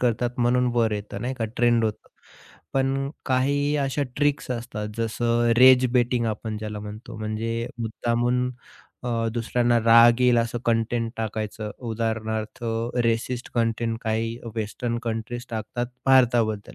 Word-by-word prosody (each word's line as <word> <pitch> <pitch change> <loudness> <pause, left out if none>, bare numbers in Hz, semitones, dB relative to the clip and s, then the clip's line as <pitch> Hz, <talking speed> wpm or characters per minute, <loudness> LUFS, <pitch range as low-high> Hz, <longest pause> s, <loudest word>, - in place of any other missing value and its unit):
करतात 120 0 0
म्हणून 125 +1 +3
वर 115 -2 +2
येतं, 105 -1 -5
नाही 125 +4 -2
का 115 - 0
ट्रेंड 120 -1 +3
होतं. 110 -1 -3 0.6
पण 135 +1 0 0.2
काही 145 +3 +1
अशा 140 0 0
ट्रिक्स 145 -2 0
असतात 115 -3 -4
जसं 115 +1 +1
रेज 130 0 +7
बेटिंग 120 -1 +2
आपण 110 0 -3
ज्याला 105 -1 -5
म्हणतो. 105 +3 -8
म्हणजे 115 +2 -2
मुद्दामून 120 +2 0 0.5
अ, 115 -2 -1
दुसऱ्यांना 120 +1 +1
राग 115 +1 +6
येईल 125 -1 +5
असं 115 +1 -1
कंटेंट 115 0 0
टाकायचं. 110 -1 -4 0.2
उदाहरणार्थ 110 0 -3 0.4
रेसिस्ट 115 +2 -1
कंटेंट 115 -1 0
काही 115 +1 -1 0.2
वेस्टर्न 115 +2 -3
कंट्रीज 120 +1 -4
टाकतात 115 +2 -3 0.2
भारताबद्दल. 120 -5 +3
115 Hz, 130 wpm, -24 LUFS, 110-125 Hz, 0.6 s, रेज